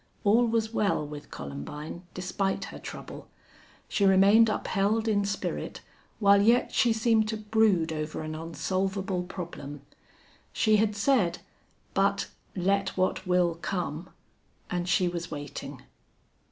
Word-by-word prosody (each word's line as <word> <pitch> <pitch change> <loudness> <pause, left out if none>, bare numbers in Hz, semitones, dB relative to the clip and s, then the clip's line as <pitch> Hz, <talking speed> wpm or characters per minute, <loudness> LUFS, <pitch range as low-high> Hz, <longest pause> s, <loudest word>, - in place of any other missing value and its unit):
All 230 +4 +4
was 225 -1 0
well 200 -8 +1
with 145 0 -9
Columbine, 110 - -7
despite 185 +2 -1
her - - -8
trouble. - - -9 0.6
She 205 - 0
remained 200 +4 +6
upheld 215 +2 0
in 205 -2 +2
spirit, 200 0 -3 0.4
while 200 -2 +5
yet 235 +4 +4
she 240 - +3
seemed 225 -1 +2
to 220 0 -2
brood 210 -6 +2
over 155 0 -4
an 155 0 -5
unsolvable 185 +4 -2
problem. 165 -6 -7 0.7
She 215 -1 +3
had 210 0 +1
said, 200 -6 +2 0.6
"But 200 0 +1 0.3
let 195 +1 0
what 185 0 0
will 180 -1 +3
come!" 175 -2 -3 0.6
and 175 0 -1
she 180 0 +3
was 175 0 -4
waiting. 145 -2 -7
195 Hz, 125 wpm, -28 LUFS, 170-215 Hz, 0.7 s, remained